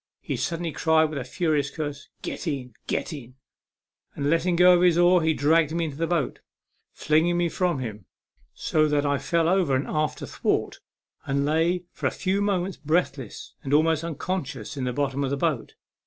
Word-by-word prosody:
He - - -3
suddenly 170 -1 -2
cried 160 0 +2
with 150 - -3
a - - -4
furious 150 -2 0
curse, 145 -1 -6
" - - -45
Get - - -5
in, 130 -5 -3
get - - -2
in! 130 -4 -10 0.4
" - - -47
and, 145 +1 0
letting 170 +2 +2
go 180 0 +6
his 175 -2 +4
oar, 175 0 +5
he 160 -1 +2
dragged 155 +1 +3
me 170 -1 0
into 145 -3 -6
the 165 +1 0
boat, 165 -5 -1 0.5
flinging 160 +3 +2
me 175 -1 +1
from 175 -2 0
him, 110 -6 -6 0.5
so 155 -1 +1
that 145 -1 +1
I 140 -1 +1
fell 165 +4 +1
over 175 -6 +2
an 130 - 0
after 155 0 -1
thwart, - - -1 0.5
and 140 +1 +1
lay 165 +4 +1
for - - -2
a - - +3
few 195 +2 -1
moments 195 -2 0
breathless, 150 - -2
and 140 +1 0
almost 160 +1 +3
unconscious, 160 - -4
in 135 -2 -3
the 125 - -1
bottom 140 +1 -1
of 135 - -1
the 140 - -1
boat. 145 -5 -1
155 Hz, 195 wpm, -25 LUFS, 140-175 Hz, 0.5 s, go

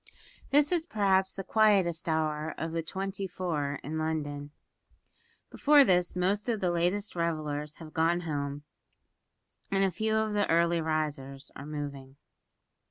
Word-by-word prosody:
This 290 +2 +4
is 340 -2 +1
perhaps 190 - +2
the 195 - -5
quietest 190 -7 +3
hour 155 -1 -1
of 165 0 -3
the 165 0 -1
twenty 195 +3 -4
four 155 -6 -2
in 155 +3 -3
London. 145 -2 -3 1.0
Before 290 -1 +6
this 180 -3 +2
most 200 +5 0
of 225 -3 0
the 180 -2 +1
latest 180 +5 0
revellers 150 -3 -2
have 160 -2 -11
gone 170 +1 +2
home, 145 -3 -3 1.1
and 195 -1 +2
few 220 +4 0
of 220 -1 +1
the 205 -1 +1
early 170 0 +3
risers 145 -4 -3
are 140 - -8
moving. 140 -3 -6
170 Hz, 140 wpm, -29 LUFS, 150-195 Hz, 1.1 s, Before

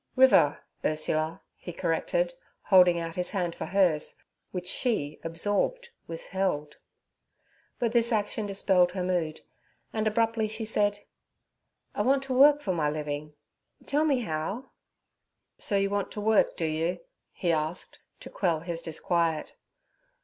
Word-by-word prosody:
'River, 255 - +5 0.3
Ursula' 155 +1 -1
he - - -8
corrected, - - -1 0.3
holding 180 -3 +6
out 165 0 -5
his 180 0 -2
hand 180 -4 -2
for - - -5
hers, 180 -6 +2 0.3
which 180 -1 -5
she, 180 - 0
absorbed, 205 - -1 0.2
withheld. 165 -3 -3 1.0
But 235 -2 0
this 235 0 +3
action 210 -1 -1
dispelled 190 -3 +2
her 185 -1 -2
mood, 175 -4 -1 0.5
and 220 0 0
abruptly 225 0 +1
she 220 +1 -4
said: 205 -1 +1 1.0
'I - - -1
want 270 +1 +2
to 270 -1 -3
work 290 +3 +6
for 190 - 0
my 155 -4 +1
living; 150 0 -4 0.5
tell 295 +2 +1
me 275 -5 +2
how?' 195 +7 -4 0.9
'So 205 - +3
you 195 0 +1
want 205 -1 -1
to - - -5
work, 215 0 +3
do 165 - -1
you?' 160 +2 -1 0.3
he 175 - -1
asked, 160 +2 -2 0.2
to - - -9
quell 170 -5 0
his 170 0 -3
disquiet. 165 0 -1
185 Hz, 140 wpm, -28 LUFS, 165-220 Hz, 1.0 s, holding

